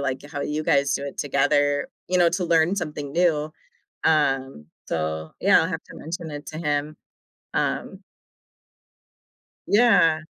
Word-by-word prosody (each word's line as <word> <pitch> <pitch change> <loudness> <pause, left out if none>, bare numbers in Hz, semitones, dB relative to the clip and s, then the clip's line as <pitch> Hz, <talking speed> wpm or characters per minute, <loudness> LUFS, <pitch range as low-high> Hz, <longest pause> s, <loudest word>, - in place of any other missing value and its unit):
like, 130 -2 -2
how 145 -2 -4
you 150 +1 -2
guys 140 -1 +2
do 140 - -2
it 140 - -8
together, 145 0 +1 0.2
you 180 0 +1
know, 175 -1 +5
to 180 +2 -1
learn 170 +2 +3
something 150 -5 -4
new, 160 -3 +1 0.5
um, 135 - +1 0.2
so, 80 0 -3
yeah, - - +5
I'll - - 0
have - - -4
to - - -13
mention 165 +1 -6
it 145 0 -7
to 155 - -7
him. 150 -1 -2 0.6
Um - - -2 1.7
Yeah. 190 -8 +4
150 Hz, 145 wpm, -24 LUFS, 140-165 Hz, 1.7 s, know